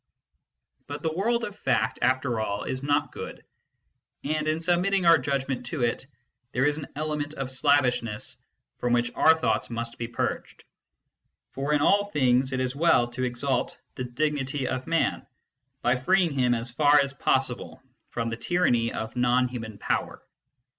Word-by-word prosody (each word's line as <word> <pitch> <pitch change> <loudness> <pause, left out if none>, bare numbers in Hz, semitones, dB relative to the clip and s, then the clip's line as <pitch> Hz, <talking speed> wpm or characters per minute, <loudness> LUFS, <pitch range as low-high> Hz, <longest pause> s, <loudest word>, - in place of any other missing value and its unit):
But 145 +1 -6
the 160 -1 0
world 230 +7 0
of 205 -3 -5
fact, - - 0
after 130 -2 +1
all, 100 -2 -2
is 130 - -3
not 145 +1 +1
good; - - -8 0.8
and, 155 +1 -1
in 155 +1 +1
submitting 180 +3 +1
our 165 -2 +7
judgment 130 -2 -2
to 130 0 -2
it, 120 +2 -1 0.5
there 130 +2 +2
is 150 0 +2
an 150 - -6
element 150 0 -3
of 135 -1 -4
slavishness 125 -5 +1 0.4
from 120 0 0
which 120 0 +1
our 160 - +5
thoughts 160 - 0
must 115 0 -5
be 120 - -3
purged. 120 - -4 0.9
For 140 +2 -3
in 150 -1 +3
all 205 +6 +4
things 130 -7 +2
it 130 - -1
is 130 0 -1
well 140 -6 +3
to 130 +1 -4
exalt 125 +1 -1
the 130 - -5
dignity 135 +1 -1
of 130 0 -3
Man, 165 0 0 0.6
by 120 +1 +3
freeing 180 +6 +2
him 125 -3 +2
as 115 +1 -4
far 145 +3 +5
as 140 -1 0
possible 130 -2 -1 0.3
from 115 -1 -3
the 115 - -3
tyranny 120 -7 +1
of 110 +2 -5
non 125 +1 +3
human 110 -4 -7
Power. - - -2
135 Hz, 165 wpm, -26 LUFS, 120-150 Hz, 0.9 s, our